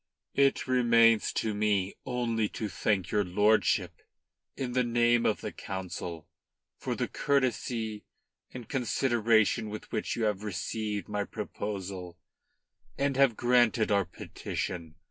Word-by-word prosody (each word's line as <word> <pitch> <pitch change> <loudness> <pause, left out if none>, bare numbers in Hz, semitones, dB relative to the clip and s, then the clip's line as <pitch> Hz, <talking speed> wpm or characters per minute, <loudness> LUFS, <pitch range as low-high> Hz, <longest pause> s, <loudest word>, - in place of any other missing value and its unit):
"It 140 -1 +3
remains 115 -3 +4
for 110 - -1
me 105 -2 +1
only 115 -4 0
to 110 - -2
thank 95 -1 -1
your 105 -1 +2
lordship 95 -2 +2 0.6
in 130 -2 -3
the 125 +1 +2
name 120 0 +3
of - - 0
the - - -4
Council 90 -4 -6 0.5
for - - -3
the - - -1
courtesy 120 -5 -1 0.5
and 125 -4 -8
consideration 115 -4 +2
with 105 0 -8
which 110 - -2
you 115 - -2
have 105 -2 0
received 105 +1 -3
my 105 -1 -1
proposal 95 -4 -5 0.8
and 140 -1 0 0.2
granted 120 -3 +3
our 100 -2 +3
petition. 80 -3 -5
110 Hz, 125 wpm, -29 LUFS, 100-120 Hz, 0.8 s, remains